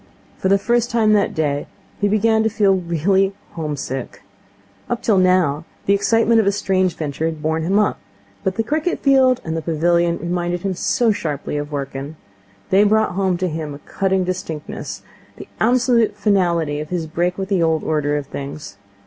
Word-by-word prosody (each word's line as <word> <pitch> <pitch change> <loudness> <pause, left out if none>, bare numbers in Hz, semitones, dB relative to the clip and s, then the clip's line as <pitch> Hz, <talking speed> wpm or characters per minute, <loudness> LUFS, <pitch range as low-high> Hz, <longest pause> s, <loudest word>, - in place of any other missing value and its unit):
For - - 0
the 195 - +5
first 240 +3 +1
time 225 -3 +3
that 205 -1 +2
day 145 -2 -1 0.3
he 205 - +2
began 220 +2 +2
to 220 - +2
feel 205 -3 +3
really 190 +2 +1 0.2
home 155 -3 -4
sick. 130 -1 -6 0.7
Up 240 - -2
till 205 -4 +3
now 180 -5 +2 0.2
the 200 - +3
excitement 225 +3 +3
of 215 - +2
a - - +5
strange 185 -3 0
venture 155 0 -3
had 160 -1 -5
borne 160 +1 0
him 185 +5 +1
up; 210 -1 +1 0.4
but 190 - -1
the 225 - 0
cricket 310 +8 -1
field 260 -2 +4
and 160 0 -3
the 165 - -2
pavilion 170 +2 +1
reminded 175 0 -2
him 195 -1 -1
so 225 +6 +1
sharply 150 -8 -3
of 145 0 -3
Wrykyn. 140 +1 -5 0.6
They 195 +2 +6
brought 215 +1 +3
home 185 -1 0
to 185 +1 -1
him 155 -2 -4
with 140 - -12
a - - -22
cutting 190 -1 +1
distinctness, 175 -4 -5 0.3
the - - -10
absolute 240 -1 +2
finality 170 -7 +1
of 155 0 -6
his 175 -3 -2
break 175 +3 -1
with 190 0 -4
the 190 -4 +2
old 160 -1 +1
order 150 -1 0
of 145 - -4
things. 140 -6 -7
180 Hz, 190 wpm, -20 LUFS, 160-205 Hz, 0.7 s, They